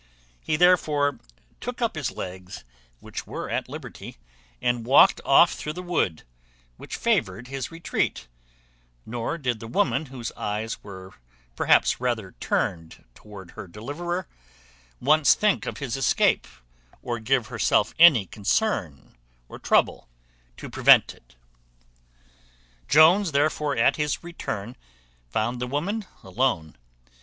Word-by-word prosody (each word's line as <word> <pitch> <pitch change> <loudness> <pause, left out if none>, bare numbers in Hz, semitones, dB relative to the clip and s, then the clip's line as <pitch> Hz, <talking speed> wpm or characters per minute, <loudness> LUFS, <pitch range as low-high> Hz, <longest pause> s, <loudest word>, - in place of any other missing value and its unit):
He 155 - -1
therefore 150 -5 +3 0.4
took 245 +1 -6
up 235 -2 0
his 150 -5 -2
legs, 90 0 -8 0.4
which - - -7
were - - -6
at - - -2
liberty, - - -9 0.4
and 120 -1 0
walked 130 +5 +5
off 150 +5 +5
through 150 - -5
the 180 +2 -7
wood, 160 - -1 0.5
which - - -7
favoured 110 +7 -1
his 135 -2 -4
retreat; 165 - -3 0.8
nor 120 +7 -4
did 125 -7 -2
the 115 - -8
woman, 130 +5 0
whose 125 -3 -6
eyes 105 +2 -4
were 95 -1 -11 0.4
perhaps - - +3
rather 115 -6 -2
turned 80 -2 -2
toward 95 - -13
her - - -9
deliverer, 155 - -5 0.7
once 150 +3 +4
think 210 -1 +1
of - - -4
his 140 -4 -4
escape, 135 - +2 0.6
or 120 -2 -3
give 120 0 0
herself - - +1
any 150 - +7
concern 100 - -2 0.3
or - - -11
trouble - - +1 0.5
to - - -8
prevent - - +5
it. - - -24 1.5
Jones 165 +4 +5
therefore, 145 0 0
at 115 - +3
his 150 +1 -2
return, 120 -10 -6 0.5
found 120 - -2
the 125 - -2
woman 190 - -2 0.2
alone. 95 - -1
125 Hz, 125 wpm, -25 LUFS, 105-155 Hz, 1.5 s, any